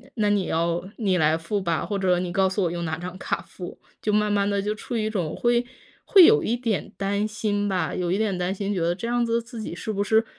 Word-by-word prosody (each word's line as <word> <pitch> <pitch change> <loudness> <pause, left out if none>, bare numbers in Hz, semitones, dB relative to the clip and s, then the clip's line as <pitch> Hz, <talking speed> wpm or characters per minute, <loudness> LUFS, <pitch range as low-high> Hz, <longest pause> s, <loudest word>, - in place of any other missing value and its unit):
那 210 -2 +1
你 200 -2 +2
要 170 +1 0 0.2
你 195 -6 +1
来 155 0 +3
付 185 +5 -2
吧， 170 -3 -1
或 200 -2 -2
者 180 -2 +3
你 180 -1 -3
告 190 +1 +3
诉 190 +1 0
我 170 - 0
用 170 -1 -3
哪 160 0 -2
张 180 +2 -7
卡 - - -2
付。 180 -2 -9 0.2
就 210 - 0
慢 210 0 +2
慢 200 0 +2
地 200 -1 0
就 210 +1 -1
处 235 +2 -6
于 220 - 0
一 - - 0
种 175 -8 -2
会 240 0 +2 0.4
会 385 -3 +8
有 440 +5 +6
一 235 - 0
点 230 -5 -2
担 200 +2 0
心 205 -1 -1
吧， 180 -5 -1
有 180 -1 -1
一 190 - +1
点 210 -4 0
担 180 +2 -1
心 200 +1 -2
觉 185 - -1
得 170 +1 +1
这 215 - -6
样 240 0 +1
子 230 0 +1
自 235 0 -10
己 170 - -5
是 220 - -4
不 200 -1 -1
是 220 +2 +3
200 Hz, 290 characters per minute, -25 LUFS, 180-215 Hz, 0.4 s, 会